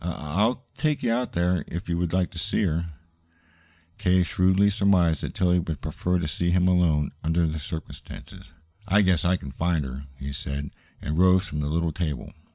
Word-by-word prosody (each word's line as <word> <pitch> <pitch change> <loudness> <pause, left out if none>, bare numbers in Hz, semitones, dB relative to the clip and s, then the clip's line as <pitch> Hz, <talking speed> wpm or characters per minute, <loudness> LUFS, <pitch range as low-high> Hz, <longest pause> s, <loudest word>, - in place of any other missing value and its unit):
I 85 0 -2
I'll 105 - -1
take 150 -2 -1
you 115 -2 +2
out 125 +1 -2
there, 85 -1 +1
if 85 +4 -6
you 85 - 0
would 85 -2 -1
like 90 -1 +1
to 85 - -6
see 105 +3 0
her." 85 -2 -1 1.1
K. 90 0 +3
shrewdly 95 +3 +3
surmised 95 -6 +3
that - - -5
Tillie 90 -1 +3
would 80 -4 -4
prefer 90 +6 -1
to 85 -3 -2
see 85 +3 -1
him 90 +1 +3
alone, 85 -5 +2
under 80 +1 +2
the 80 0 -2
circumstances. 80 +2 -8 0.4
"I 100 +2 +4
guess 95 -3 +2
I 90 +2 +3
can 70 -5 -8
find 80 +1 0
her," 65 +2 -7
he 70 +1 -6
said, 70 +1 -4 0.3
and 75 +2 -2
rose 95 +1 +5
from 75 -3 -4
the 75 0 -1
little 85 +1 0
table. 75 -5 -4
85 Hz, 195 wpm, -25 LUFS, 80-95 Hz, 1.1 s, rose